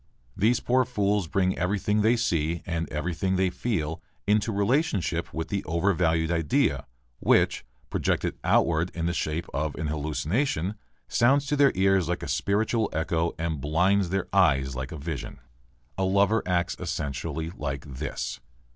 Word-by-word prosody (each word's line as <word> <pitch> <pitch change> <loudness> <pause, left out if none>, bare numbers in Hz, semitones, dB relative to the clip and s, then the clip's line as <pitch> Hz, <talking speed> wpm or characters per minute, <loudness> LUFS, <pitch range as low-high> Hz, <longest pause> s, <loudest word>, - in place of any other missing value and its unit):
These 115 +4 +2
poor 130 +1 +3
fools 105 -6 0
bring 95 +2 +1
everything 105 +3 +1
they 110 +3 +4
see 85 -8 0
and 85 -1 -2
everything 85 +5 -1
they 95 -1 +2
feel 85 -6 -2 0.2
into 105 +2 +2
relationship 100 - 0
with 80 0 -4
the 100 -1 -2
overvalued 85 -1 +1
idea 75 -4 +1 0.3
which, - - +3 0.3
projected - - 0
outward 85 +1 +2
in 85 -1 -2
the 85 - 0
shape 80 0 -2
of 75 +2 -2
an 80 - -4
hallucination, 80 - -1 0.3
sounds 135 +4 +3
to 145 - 0
their 140 -1 +5
ears 95 -2 +3
like 90 0 -2
a - - -4
spiritual 110 +2 +1
echo 80 +1 -1
and 80 -3 -2
blinds 90 +6 +2
their 95 0 -1
eyes 70 -9 +3
like 65 +1 -5
a 80 - -6
vision. 75 0 -5 0.6
A - - +2
lover 100 +3 +3
acts 90 0 0
essentially 80 -1 -3
like 70 -5 -5
this. 70 -2 -5
85 Hz, 150 wpm, -26 LUFS, 80-100 Hz, 0.6 s, their